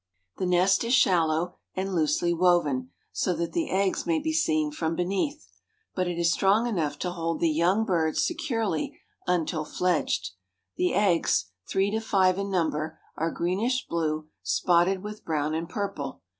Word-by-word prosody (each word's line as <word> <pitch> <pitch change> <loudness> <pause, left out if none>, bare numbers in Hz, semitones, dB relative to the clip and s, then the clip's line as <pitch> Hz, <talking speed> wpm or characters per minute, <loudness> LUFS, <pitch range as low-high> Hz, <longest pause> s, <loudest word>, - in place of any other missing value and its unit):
The 185 - -1
nest 185 +3 +3
is 235 +2 +3
shallow 175 -4 +2 0.2
and 190 +1 -2
loosely 165 +1 +1
woven, 165 -7 +2 0.2
so 180 - 0
that 170 +1 -2
the 335 -2 -1
eggs 195 0 0
may 335 -1 +2
be 315 +1 -1
seen 155 - +1
from 160 +2 -2
beneath. 200 - -2 0.5
But 185 -1 -1
it 175 -1 -3
is 170 0 +3
strong 200 +6 +3
enough 165 -11 -1
to 180 +3 -3
hold 165 -2 -2
the 165 - +2
young 180 +8 +2
birds 165 -6 +1
securely 225 - -2 0.3
until 165 -3 0
fledged. 150 - 0 0.4
The 180 - +1
eggs, 170 - +2 0.2
three 195 +1 +1
to 220 - 0
five 190 -4 +2
in 200 0 -2
number, 160 -3 -1 0.2
are 165 +1 -1
greenish 205 +11 -1
blue, 155 -2 -1
spotted 175 - +2
with 210 0 -7
brown 155 -1 -1
and 165 +1 -3
purple. 160 - -4
175 Hz, 160 wpm, -27 LUFS, 160-195 Hz, 0.5 s, nest